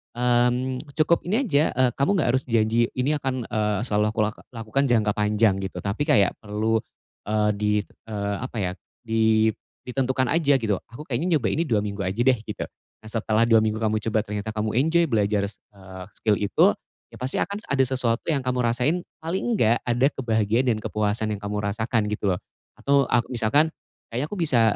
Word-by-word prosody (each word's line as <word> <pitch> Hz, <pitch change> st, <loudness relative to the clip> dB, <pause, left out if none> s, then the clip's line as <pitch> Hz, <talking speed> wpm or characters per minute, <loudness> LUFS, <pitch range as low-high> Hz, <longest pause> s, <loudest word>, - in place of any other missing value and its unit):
mmm, 125 Hz, +3 st, +1 dB, 0.2 s
cukup 170 Hz, +2 st, +3 dB
ini 220 Hz, +9 st, +1 dB
aja, 150 Hz, -, +2 dB
eee, 130 Hz, -1 st, +3 dB
kamu 140 Hz, -, +1 dB
enggak 140 Hz, -, +1 dB
harus 130 Hz, -, 0 dB
janji, 115 Hz, 0 st, +2 dB
"Ini 145 Hz, +4 st, 0 dB
akan, 135 Hz, -2 st, -2 dB, 0.2 s
eee, 105 Hz, -2 st, 0 dB
selalu 105 Hz, -3 st, +1 dB
aku -, -, -3 dB
laka 105 Hz, 0 st, -3 dB
lakukan 115 Hz, +4 st, -1 dB
jangka 110 Hz, -4 st, +2 dB
panjang," 105 Hz, -1 st, +2 dB
gitu, 95 Hz, 0 st, -5 dB
tapi 100 Hz, +8 st, -1 dB
kayak 105 Hz, -, +4 dB
perlu, 110 Hz, +1 st, 0 dB, 0.5 s
eee, 105 Hz, 0 st, +2 dB
di, 105 Hz, 0 st, +1 dB, 0.4 s
eee, 100 Hz, -2 st, -2 dB
apa 130 Hz, -1 st, -6 dB
ya, 90 Hz, -3 st, -1 dB, 0.3 s
di 110 Hz, -1 st, +3 dB, 0.4 s
ditentukan 130 Hz, 0 st, 0 dB
aja 150 Hz, -4 st, +3 dB
gitu, 105 Hz, -5 st, 0 dB
"Aku 120 Hz, +6 st, -9 dB
kayaknya 160 Hz, +7 st, 0 dB
nyoba 115 Hz, -, -1 dB
ini 160 Hz, -, +1 dB
2 110 Hz, -6 st, +2 dB
minggu 100 Hz, -1 st, -4 dB
aja 95 Hz, +4 st, -4 dB
deh," 130 Hz, -2 st, +3 dB
gitu. -, -, -5 dB, 0.4 s
Nah, 110 Hz, -, -10 dB
setelah 115 Hz, +1 st, +1 dB
2, 115 Hz, -, +6 dB
minggu 110 Hz, +1 st, -2 dB
kamu 110 Hz, 0 st, +1 dB
coba 110 Hz, 0 st, 0 dB
ternyata 105 Hz, 0 st, -5 dB
kamu 110 Hz, 0 st, -2 dB
enjoy 165 Hz, +5 st, +3 dB
belajar 105 Hz, -3 st, +1 dB
s 105 Hz, -, -11 dB, 0.2 s
eee, 95 Hz, -1 st, -10 dB
skill 105 Hz, -2 st, +1 dB
itu, 100 Hz, -2 st, +3 dB, 0.4 s
ya 115 Hz, -, -12 dB
pasti 130 Hz, +2 st, -2 dB
akan 200 Hz, +2 st, -2 dB
ada 140 Hz, -1 st, +2 dB
sesuatu 125 Hz, -3 st, 0 dB
yang 150 Hz, -4 st, +2 dB
kamu 125 Hz, 0 st, 0 dB
rasain, 125 Hz, +9 st, +1 dB, 0.2 s
paling 165 Hz, +4 st, -3 dB, 0.2 s
enggak, 115 Hz, -, +3 dB
ada 120 Hz, +2 st, +1 dB
kebahagiaan 115 Hz, 0 st, +1 dB
dan 115 Hz, -, +1 dB
kepuasan 105 Hz, +1 st, -1 dB
yang 100 Hz, -, -6 dB
kamu 105 Hz, 0 st, -3 dB
rasakan, 110 Hz, +2 st, 0 dB
gitu 105 Hz, -1 st, -1 dB
loh. 90 Hz, -1 st, 0 dB, 0.4 s
Atau 140 Hz, 0 st, +2 dB
a 120 Hz, -, +4 dB
misalkan, 130 Hz, +7 st, +1 dB, 0.4 s
"Kayaknya 125 Hz, +5 st, -1 dB
aku 205 Hz, -, -6 dB
bisa, 145 Hz, -9 st, +3 dB
115 Hz, 190 wpm, -24 LUFS, 105-130 Hz, 0.5 s, 2